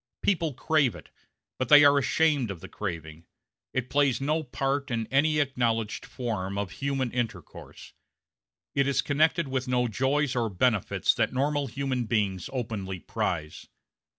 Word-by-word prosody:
People 165 -8 +1
crave 145 -2 +2
it, - - -13 0.5
but 130 - -1
they 150 0 +9
are 145 0 +6
ashamed 140 -2 +2
of 95 -4 -6
the - - -9
craving. 80 -4 -6 0.4
It 130 -1 -3
plays 140 -4 +2
no 150 +4 0
part 140 0 -2
in 115 -2 -1
any 150 +3 +3
acknowledged 120 -6 0
form 100 -6 -4
of 100 -3 -3
human 135 -1 -2
intercourse; 115 -9 -6 0.8
it 140 0 +2
is 140 - +1
connected 155 +2 +2
with 130 -1 -2
no 125 -1 +1
joys 135 +4 0
or 115 -2 0
benefits 105 +1 +1
that - - 0
normal 145 +2 0
human 135 -3 -2
beings 100 -5 -1
openly 110 -7 -4
prize. 75 -2 -3
130 Hz, 150 wpm, -27 LUFS, 110-140 Hz, 0.8 s, they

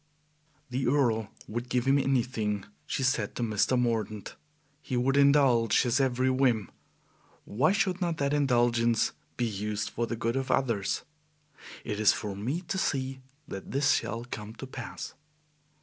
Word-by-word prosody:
"The 130 +1 -1
Earl 120 -6 +2 0.2
would 120 +3 -4
give 125 -1 +1
him 135 +1 +4
anything," 115 -7 0 0.2
she 135 - -1
said 125 -5 0
to 120 - -2
Mr. 115 +3 +2
Mordaunt. 110 -4 -2 0.5
"He 130 - -3
would 135 +3 +2
indulge 140 -6 +5
his 125 +2 +1
every 130 -1 +2
whim. 125 -7 +1 0.7
Why 135 - +2
should 195 -2 0
not 170 -3 0
that 140 0 0
indulgence 120 -5 +2 0.3
be 120 - +1
used 105 0 -3
for 120 0 -2
the 115 - -2
good 115 +1 -1
of 135 0 -2
others? 115 -8 0 0.8
It 105 -2 -3
is 110 - +5
for 100 -2 -4
me 130 - -2
to 190 +2 -3
see 130 -5 -1 0.3
that 95 - -7
this 140 +2 +2
shall 115 -3 -1
come 110 -2 -7
to - - -7
pass." 130 - -7
120 Hz, 155 wpm, -29 LUFS, 110-135 Hz, 0.8 s, indulge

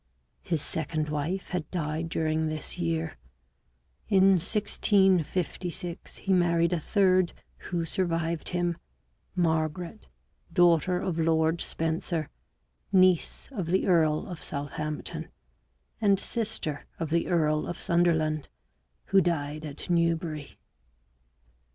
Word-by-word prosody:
His 160 -4 -1
second 155 -1 -1
wife 155 +6 -2
had 175 -4 -3
died 160 -1 -2
during 160 -1 0
this 155 -1 -3
year; 80 -1 -1 0.9
in 195 -2 +5
1656 185 -3 0
he 195 - 0
married 170 -1 +3
a 175 - +1
third, 185 0 +3 0.4
who 170 -2 -1
survived 165 -1 -1
him, 175 -1 0 0.6
Margaret, 165 +3 -1 0.4
daughter 175 +1 +4
of 175 -3 -2
Lord 160 0 +2
Spencer, 160 -1 -2 0.6
niece 185 -3 +3
of 195 -10 -3
the 185 +3 +2
earl 160 -4 +3
of 175 -4 -7
Southampton, 150 +1 -4 0.7
and 200 -3 +4
sister 215 -12 -2
of 165 -2 -4
the 170 0 +1
earl 155 -3 +1
of 175 - -5
Sunderland, 160 -3 +1 0.6
who 195 0 +4
died 155 -3 -1
at 145 -1 -7
Newbury. 165 -4 0
170 Hz, 110 wpm, -28 LUFS, 155-180 Hz, 0.9 s, in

